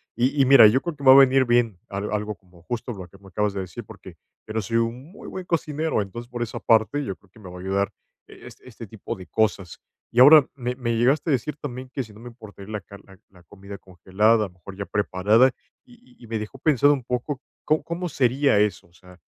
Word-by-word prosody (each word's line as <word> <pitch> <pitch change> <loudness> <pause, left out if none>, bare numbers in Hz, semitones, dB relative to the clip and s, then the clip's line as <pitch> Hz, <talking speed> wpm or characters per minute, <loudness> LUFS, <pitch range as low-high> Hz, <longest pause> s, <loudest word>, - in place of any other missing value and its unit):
Y 130 +4 +1
y - - +4
mira, 130 -3 +8
yo 125 +6 +2
creo 170 -2 -5
que 140 - -12
va 130 - +9
a - - +7
venir 135 -1 +6
bien 120 -5 +1
al 100 +1 -4
algo 105 0 -2
como 90 -3 -23
justo 120 +4 -5
lo 95 -6 -8
que 100 - -19
me 100 - -17
acabas 105 0 -1
de 100 - -3
decir 90 -3 -8
porque, - - -13 0.3
pero 110 +1 -3
soy 115 +4 -1
un 120 +7 -3
muy 205 - -12
buen 185 - -7
cocinero, 160 -5 -1
entonces, 120 +4 -8
por 120 -1 -6
esa 115 - -6
parte, 115 +6 +2
yo 95 - -4
creo 95 - -28
que 110 - -20
me 95 -4 -11
va 90 - -10
a - - -9
ayudar 100 +1 -1 0.3
e - - -14
es - - -14
este - - -12
tipo - - -7
de 95 - -12
cosas. 100 -5 -1 0.3
Y 120 - 0
ahora, 145 +1 +9
me 125 -2 -3
me 120 -2 -2
llegaste 135 +8 +1
a - - +3
decir 135 +3 -2
también 130 -2 -6
que 135 - -2
si 110 -3 -15
no 105 - -15
me 120 +2 -10
importaría 110 -4 -13
la 105 -2 -4
car 100 +3 -14
la 95 0 -17
la 90 -2 -21
comida 100 +3 -11
congelada, 100 +4 +1
a - - -6
lo - - -23
mejor 95 +2 -12
ya 100 +1 -5
preparada. 105 +5 +2 0.3
Y 245 0 -21
y - - -17
y - - -12
me 110 0 -3
dejó 105 +5 -8
pensado 145 0 +3
un 135 -3 -4
poco, 125 +3 -3 0.2
¿có 155 +1 +1
cómo 175 +1 -4
sería 135 -2 +2
eso?, 105 -4 -1
O 85 - -30
sea, 90 0 -18
115 Hz, 255 wpm, -23 LUFS, 100-135 Hz, 0.3 s, va